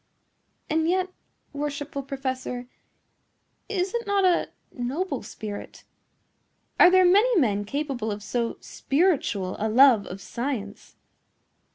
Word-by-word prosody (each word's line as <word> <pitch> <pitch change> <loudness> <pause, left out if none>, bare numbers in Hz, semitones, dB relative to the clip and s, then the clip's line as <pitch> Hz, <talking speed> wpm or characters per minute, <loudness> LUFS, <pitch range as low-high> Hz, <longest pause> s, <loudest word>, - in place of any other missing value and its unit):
"And 320 +1 +1
yet, 370 +1 0 0.4
worshipful 285 0 -4
professor, 260 -2 -4 1.0
is 380 -2 -1
it 470 -2 -2
not 400 -1 +2
a 360 -2 +2 0.2
noble 275 +4 -3
spirit? 210 -1 -8 1.0
Are - - +9
there 370 0 +5
many 410 +4 +5
men 205 -7 +1
capable 265 -3 -3
of 205 0 -5
so 235 +3 -2
spiritual 275 - 0
a 220 +1 0
love 240 -2 +6
of 185 - -7
science?" 230 -2 -5
275 Hz, 110 wpm, -25 LUFS, 225-360 Hz, 1.0 s, Are